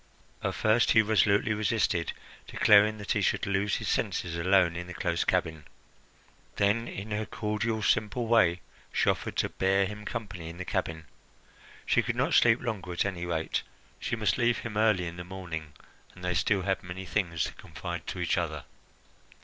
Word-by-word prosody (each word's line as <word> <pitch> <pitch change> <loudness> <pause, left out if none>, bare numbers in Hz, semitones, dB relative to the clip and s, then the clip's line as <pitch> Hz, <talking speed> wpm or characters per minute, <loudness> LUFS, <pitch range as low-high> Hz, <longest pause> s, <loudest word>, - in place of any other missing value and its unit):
At - - -1
first 110 +2 +3
he 110 - +6
resolutely 105 0 +3
resisted, 105 -5 0 0.4
declaring 105 +1 +5
that 105 -1 -5
he 105 - +2
should - - +1
lose 100 +1 0
his - - -4
senses 85 -2 -1
alone 90 0 +3
in 90 +1 -5
the 90 - -8
close - - 0
cabin. 80 -2 -1 0.9
Then, 105 +4 +1
in 100 +3 -7
her 105 0 -2
cordial, 105 +1 -2
simple 110 +3 +1
way, 100 -7 +3 0.3
she - - +3
offered - - -5
to - - +1
bear 95 +1 +2
him 105 +2 -7
company 100 -7 -5
in 85 - -9
the 90 - -5
cabin. 80 -5 -3 0.8
She - - +3
could - - -2
not - - 0
sleep 120 0 +5
longer, 100 -7 -4
at 85 - 0
any 90 -3 -3
rate; 80 -2 -1 0.4
she - - -2
must - - 0
leave 120 -1 +3
him 110 -3 -6
early 105 -4 +3
in 85 +1 -6
the 90 - -5
morning, 85 -5 -7 0.4
and 90 0 -8
they 90 - 0
still 95 +2 +1
had 95 0 0
many 90 +2 -7
things 85 -3 -1
to - - -4
confide 85 +1 -7
to 90 - -4
each 90 +1 +1
other. 80 -5 -3
95 Hz, 180 wpm, -29 LUFS, 85-105 Hz, 0.9 s, he